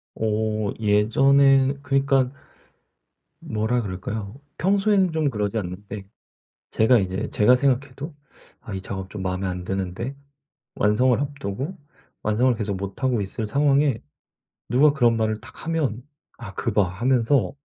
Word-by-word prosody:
어 110 -1 -1
예전엔 135 +6 +4
그러니까 135 -1 +2 1.1
뭐라 110 +3 -1
그럴까요? 100 +4 -5 0.2
평소에는 195 -1 +2
좀 155 -3 +1
그러지 105 -2 -2
않는데 100 +1 -7 0.6
제가 115 +2 +4
이제 95 +1 -2
제가 125 +4 +5
생각해도 140 +3 -1 0.5
'아 105 - -8
이 95 - -3
작업 95 0 -6
좀 105 - -6
마음에 95 +1 -2
안 90 -1 -4
드는데.' 95 +8 -3 0.6
완성을 115 +5 +3
앞두고 140 - -4 0.5
완성을 120 +4 +2
계속 100 -3 -2
못 100 +5 -7
하고 125 -4 +2
있을 105 +3 -4
상황에 140 0 +2 0.7
누가 135 +6 +5
그런 120 -5 +3
말을 110 -1 0
탁하면 145 -8 -3 0.3
'아 100 -4 -9
그 115 - -2
봐.' 100 -4 +3
하면서 120 +2 +1
115 Hz, 275 characters per minute, -23 LUFS, 100-135 Hz, 1.1 s, 제가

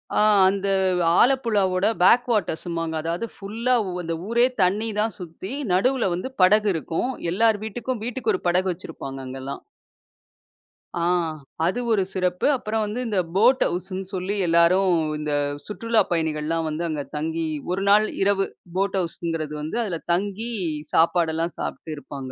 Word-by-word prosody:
அ, - - +3 0.3
அந்த 200 0 -2 0.5
ஆலப்புழா 235 -6 +3
ஓட 185 +2 +2 0.2
பேக் 245 +7 +5
வாட்டர்ஸ்ம்மாங்க. 165 -5 -1
அதாவது, 170 +7 -2
புல்லா 225 +5 -1 0.3
அந்த 165 0 -3
ஊரே 235 +2 +4 0.2
தண்ணி 205 +5 +1
தான் 215 -1 0
சுத்தி 180 +2 -7 0.2
நடுவுல 245 +5 +2
வந்து 185 +9 -4
படகு 210 +3 +5
இருக்கும். 165 - -2 0.2
எல்லார் 220 +3 +3
வீட்டுக்கும், 235 +2 -4
வீட்டுக்கு 250 - -1
ஒரு - - -5
படகு 185 +2 +2
வச்சிருப்பாங்க, 145 -6 -8
அங்கல்லாம். 130 +1 -6 1.3
அ, - - -2 0.7
அது 190 +8 0
ஒரு 205 -3 +3
சிறப்பு. 180 -1 0
அப்புறம், 220 -2 -2 0.2
இந்த 210 -5 0 0.2
போட் 245 +6 +5
ஹவுஸ்ன்னு 185 +2 -4
சொல்லி 190 +2 -2
எல்லாரும் 170 +3 +4 0.3
இந்த 150 0 -3 0.3
சுற்றுலா 230 +1 +1
பயணிகள்லாம் 160 0 -1
வந்து 155 +2 -3
அங்க 150 -2 -3
தங்கி 160 +2 -2 0.3
ஒரு 195 +1 -2
நாள் 210 +1 +6 0.2
இரவு 195 0 +3 0.3
போட் 195 0 0
ஹவுஸ்ங்கிறது 165 -3 -4
வந்து 155 +8 -4
அதுல 180 -7 -3
தங்கி 205 +5 -1 0.4
சாப்பாடு 165 0 +3
எல்லாம் 165 +1 -2
சாப்பிட்டு 160 - -5
இருப்பாங்க. 135 -2 -8
185 Hz, 140 wpm, -23 LUFS, 165-215 Hz, 1.3 s, நாள்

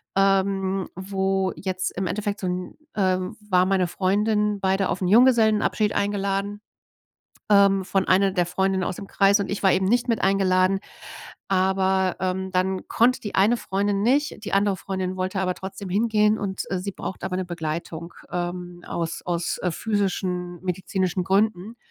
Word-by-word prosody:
ähm, 195 -1 +1
wo 190 0 -1
jetzt 185 -1 -2
im 190 - -1
Endeffekt 205 +2 -2
so 185 - -3
'n 180 0 -4 0.2
äh, 185 -3 +2 0.3
war 180 0 +4
meine 190 -2 +2
Freundin, 210 +3 +1
beide 190 0 +1
auf 185 - -2
'n 180 - 0
Junggesellenabschied 220 -2 +4
eingeladen, 200 0 -1 0.9
ähm, 200 -2 +5
von 190 0 0
einer 195 +1 +4
der 175 -2 +1
Freundinnen 190 +1 0
aus - - -2
dem 200 - -9
Kreis. 200 +1 +3
Und 200 - -3
ich 200 - -3
war 190 - +6
eben 190 0 +1
nicht 240 +4 +2
mit 230 - 0
eingeladen. 190 -1 +3 0.7
Aber, 190 0 +1
ähm, 190 0 -2
dann 185 +1 -1
konnte 250 +3 +3
die 205 - -6
eine 220 +5 +3
Freundin 200 +1 -1
nicht, 275 0 +1
die - - -1
andere 200 -1 +2
Freundin 190 -1 -3
wollte 185 +1 -2
aber 185 -1 0
trotzdem 190 0 -7
hingehen 215 +1 +2
und, 190 -2 -3
äh, 185 - 0
sie 200 +2 -4
braucht 190 - -7
aber 185 -1 -2
'ne 185 - -2
Begleitung. 170 0 -5 0.2
Ähm, 175 0 -4
aus 165 -1 -3
aus, 175 -1 -1
äh, 180 - +1
physischen 180 -3 -2
medizinischen 185 0 -1
Gründen 205 +2 0
190 Hz, 165 wpm, -24 LUFS, 185-200 Hz, 0.9 s, war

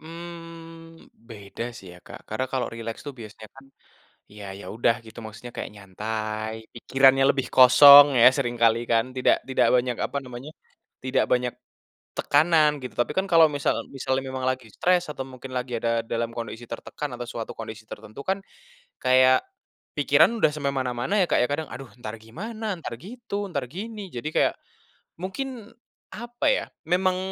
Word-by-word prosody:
Mhm. 165 0 -11 0.2
Beda 105 0 -8
sih 95 - -12
ya, 90 - -14
Kak. - - -10
Karena 130 +5 -2
kalau 130 -2 0
rileks 115 0 -6
tuh - - -3
biasanya 110 0 -11
kan, 135 0 -15 0.7
ya 105 - -9
ya, - - -10
udah 115 0 +3
gitu, 110 +1 -13
maksudnya 115 +3 -10
kayak - - -5
nyantai, 110 +2 -4 0.2
pikirannya 135 +2 +4
lebih 135 -2 -2
kosong 140 +3 +10
ya, 120 - +10
seringkali 120 -4 +2
kan, 115 0 +3
tidak 130 - +3
tidak 130 - +3
banyak, 125 -1 +1
apa - - -7
namanya, 125 +3 -9 0.5
tidak 130 - +1
banyak 125 -1 +2 0.7
tekanan, 155 0 +4
gitu. 125 - -6
Tapi 120 - 0
kan 190 - +2
kalau 165 -1 +8
misal 140 - +1 0.2
misalnya 130 0 -1
memang 130 0 -4
lagi 130 -2 -4
stress, 180 - +1
atau 135 - -6
mungkin 130 +1 -10
lagi 125 0 -3
ada 115 0 0
dalam 115 0 -1
kondisi 115 0 -6
tertekan 150 - -6
atau 120 - -5
suatu 115 -2 -6
kondisi 110 -1 -8
tertentu 110 +6 -10
kan, 190 0 +1 0.6
kayak 130 +1 +4 0.5
pikiran - - +4
udah 155 - +4
sampai 140 -2 -2
mana-mana 125 +5 -2
ya, - - +4
Kak, - - +3
ya. 125 - +2
Kadang, 155 +2 -3
aduh, 130 0 -9
entar 110 -2 -7
gimana, 215 - -7
entar 145 -7 -7
gitu, 205 -1 -6
entar 140 -7 -3
gini. 205 - -7
Jadi 135 +6 -4
kayak - - +3 0.7
mungkin, 230 +3 -5 0.5
apa 240 +2 -5
ya, - - +2 0.2
memang 185 +1 +2
130 Hz, 165 wpm, -25 LUFS, 115-165 Hz, 0.7 s, kosong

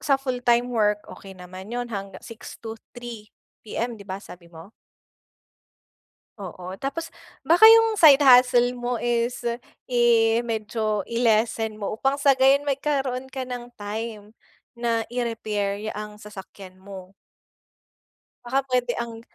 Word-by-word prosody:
sa 275 -2 +2
full-time 245 -2 0
work, 210 -2 +1
okey 195 -1 -12
naman 185 +2 -11
'yon 240 0 -5
hangga 195 -1 -6
6:00-3:00 225 0 -10 0.3
PM, 230 +1 -5
'di 200 - -13
ba, 190 - -3
sabi 180 -4 -13
mo? 170 +5 -13 1.7
Oo. 185 -1 -8
Tapos, 325 +5 -4 0.3
baka 350 +7 +6
yung 450 -1 +6
side 295 -3 +7
hustle 250 -2 +6
mo, 245 -1 -3
is 240 0 -1 0.5
i 230 -2 +3
medyo 215 -2 -2
i-lessen 225 -1 +1
mo 200 - -3
upang 270 +4 +1
sa 275 -2 +4
gayon, 270 +2 +5
magkaroon 270 -2 -2
ka 265 0 -6
ng 245 -1 -7
time 210 0 -6 0.5
na 230 -1 0
i-repair 215 -4 -3
ya 215 - -4
ang 210 0 -7
sasakyan 195 -2 -12
mo. 190 -1 -11 1.3
Baka 265 +2 0
puwede 250 -2 0
ang 230 -1 -5
235 Hz, 125 wpm, -24 LUFS, 210-250 Hz, 1.7 s, side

